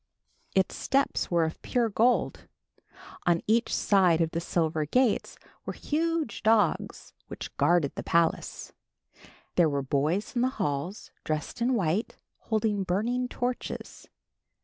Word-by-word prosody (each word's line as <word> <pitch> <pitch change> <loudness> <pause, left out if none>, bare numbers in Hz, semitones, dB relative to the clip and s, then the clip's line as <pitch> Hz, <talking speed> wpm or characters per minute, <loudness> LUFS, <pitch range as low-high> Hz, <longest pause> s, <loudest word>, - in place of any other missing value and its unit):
Its 190 -1 +2
steps 275 +1 0
were 170 -2 +3
of 160 - -5
pure 240 -2 +1
gold. 230 +4 +1 0.8
On 170 -1 +4
each 230 +2 +2
side 185 -5 +3
of 165 -1 +1
the 165 - -2
silver 160 -2 0
gates 245 - +1 0.3
were - - -5
huge 320 -5 -1
dogs 215 -5 +1
which - - -8
guarded 170 -5 +3
the - - -5
palace. 170 -1 0 0.8
There 170 -3 +5
were 140 -1 -1
boys 155 - -1
in 240 - +2
the 255 - +3
halls 175 +1 -3
dressed 155 +9 -3
in 250 +2 +2
white, 190 +1 -1 0.2
holding 215 -2 0
burning 230 +8 0
torches. 245 0 -4
195 Hz, 130 wpm, -28 LUFS, 165-240 Hz, 0.8 s, There